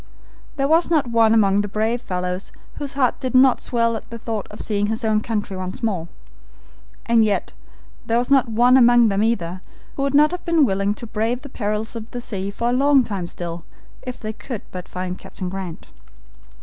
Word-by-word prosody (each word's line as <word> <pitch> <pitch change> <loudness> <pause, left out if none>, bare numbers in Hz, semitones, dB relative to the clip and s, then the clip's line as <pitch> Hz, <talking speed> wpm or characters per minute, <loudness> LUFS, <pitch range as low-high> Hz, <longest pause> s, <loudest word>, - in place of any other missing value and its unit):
There 275 -1 +1
was 325 +3 +3
not 295 -7 +1
one 225 -1 +4
among 205 -3 +4
the 205 - -3
brave 220 +4 -1
fellows 180 -2 -4 0.3
whose 285 -2 -4
heart 260 -3 +1
did 255 0 -3
not 255 0 +5
swell 230 -1 0
at 220 - -7
the 230 - -6
thought 225 -2 -4
of 210 - -11
seeing 205 -1 0
his 225 +2 -2
own 215 -1 +2
country 210 -3 -3
once 185 +2 -5
more; 185 -7 -1 1.0
and 230 -1 +4
yet 210 -2 0 0.5
there 230 - +2
was 245 +3 -1
not 265 -3 +4
one 245 +3 +5
among 240 -2 +6
them 200 0 0
either 185 -6 -1 0.4
who - - -2
would 275 0 0
not 300 +2 +6
have 360 - -5
been 335 -4 +3
willing 200 -1 0
to 235 - -7
brave 230 +4 -2
the 285 - -9
perils 215 -1 -3
of 225 0 -7
the 245 - -5
sea 200 -5 -4
for 235 +4 -2
a - - +1
long 275 +1 +4
time 195 -6 -4
still 170 -1 -6 0.4
if 250 -1 -7
they 215 0 -5
could 230 -1 -7
but 180 -1 -8
find 185 0 -5
Captain 185 - -6
Grant. 185 -3 -6
225 Hz, 205 wpm, -21 LUFS, 200-250 Hz, 1.0 s, among